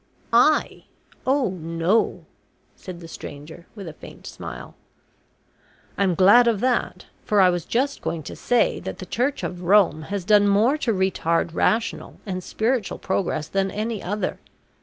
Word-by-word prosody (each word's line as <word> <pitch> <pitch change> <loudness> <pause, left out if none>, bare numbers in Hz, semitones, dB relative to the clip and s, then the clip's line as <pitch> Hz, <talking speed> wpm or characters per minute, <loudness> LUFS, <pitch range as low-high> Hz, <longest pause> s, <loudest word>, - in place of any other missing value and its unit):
"I - - +3 0.4
oh 270 -3 +2
no," 165 +4 0 0.5
said 180 -2 -10
the 165 - -9
stranger 160 +2 -10
with 200 -4 -8
a 160 - -7
faint - - -13
smile. - - -8 1.2
"I'm 190 -3 +1
glad 205 +7 +6
of 225 -4 +2
that, 255 -1 -1 0.2
for 210 - +1
I 185 -2 +6
was 175 -2 -3
just 275 +4 -1
going 160 -2 -3
to - - -8
say 245 -1 +1
that - - -6
the 185 - -8
Church 255 +8 -1
of 180 -1 -4
Rome 185 -3 +4
has 200 -3 -3
done 205 0 +5
more 215 +7 +3
to 240 - 0
retard 175 -4 0
rational 225 +6 -1
and 185 -3 -4
spiritual 225 +1 -1
progress 175 -5 -2
than 195 0 0
any 215 +1 -3
other. 205 +3 -3
195 Hz, 155 wpm, -23 LUFS, 175-225 Hz, 1.2 s, glad